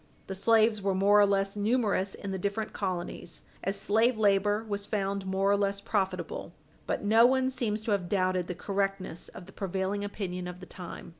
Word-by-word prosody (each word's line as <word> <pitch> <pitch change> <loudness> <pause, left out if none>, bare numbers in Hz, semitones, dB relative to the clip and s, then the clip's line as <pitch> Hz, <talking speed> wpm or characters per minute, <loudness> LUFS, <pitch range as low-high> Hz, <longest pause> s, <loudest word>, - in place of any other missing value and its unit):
The 195 - -5
slaves 220 +2 +3
were 195 -1 0
more 200 +2 +5
or 205 - +6
less 195 0 +1
numerous 205 -3 +1
in 200 - -6
the 190 - -3
different 200 +3 -2
colonies 175 -2 -4 0.2
as 195 +1 -1
slave 225 +3 +2
labor 205 0 +3
was 200 -1 -3
found 195 -2 -2
more 195 +1 +2
or - - +5
less 200 0 0
profitable. 190 -5 -2 0.3
But - - -1
no 225 +3 +6
one 260 0 +2
seems 220 -4 -2
to 220 - -2
have 185 -4 0
doubted 185 -2 +1
the 180 - -4
correctness 195 -2 -2
of 180 - -11
the 190 - -14
prevailing 195 +1 -2
opinion 185 -3 -4
of 180 0 -7
the 185 - -9
time. 180 -1 -9
200 Hz, 195 wpm, -29 LUFS, 190-210 Hz, 0.3 s, or